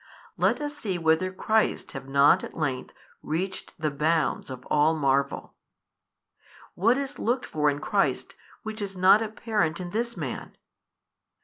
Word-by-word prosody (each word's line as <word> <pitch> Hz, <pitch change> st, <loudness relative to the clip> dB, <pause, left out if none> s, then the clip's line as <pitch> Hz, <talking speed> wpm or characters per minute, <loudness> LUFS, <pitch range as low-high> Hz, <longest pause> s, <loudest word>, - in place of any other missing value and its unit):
let -, -, +2 dB
us 295 Hz, 0 st, -4 dB
see 200 Hz, -10 st, -3 dB
whether 165 Hz, +2 st, +2 dB
Christ 220 Hz, +3 st, 0 dB
have -, -, -8 dB
not 140 Hz, +1 st, +5 dB
at -, -, -8 dB
length 140 Hz, -5 st, -2 dB, 0.3 s
reached 185 Hz, +5 st, -3 dB
the 155 Hz, -3 st, -1 dB
bounds 155 Hz, +2 st, 0 dB
of 130 Hz, -1 st, -8 dB
all 150 Hz, +2 st, +3 dB
marvel! 140 Hz, -2 st, 0 dB, 1.2 s
what 230 Hz, +8 st, +3 dB
is 280 Hz, 0 st, -4 dB
looked 240 Hz, +3 st, 0 dB
for 150 Hz, -1 st, +1 dB
in 145 Hz, -, -1 dB
Christ 145 Hz, -, 0 dB, 0.3 s
which 220 Hz, 0 st, -6 dB
is 195 Hz, -2 st, -5 dB
not 190 Hz, +4 st, +6 dB
apparent 215 Hz, -6 st, -1 dB
in 175 Hz, -1 st, -6 dB
this 235 Hz, +3 st, -2 dB
Man? -, -, -6 dB
175 Hz, 145 wpm, -26 LUFS, 150-220 Hz, 1.2 s, not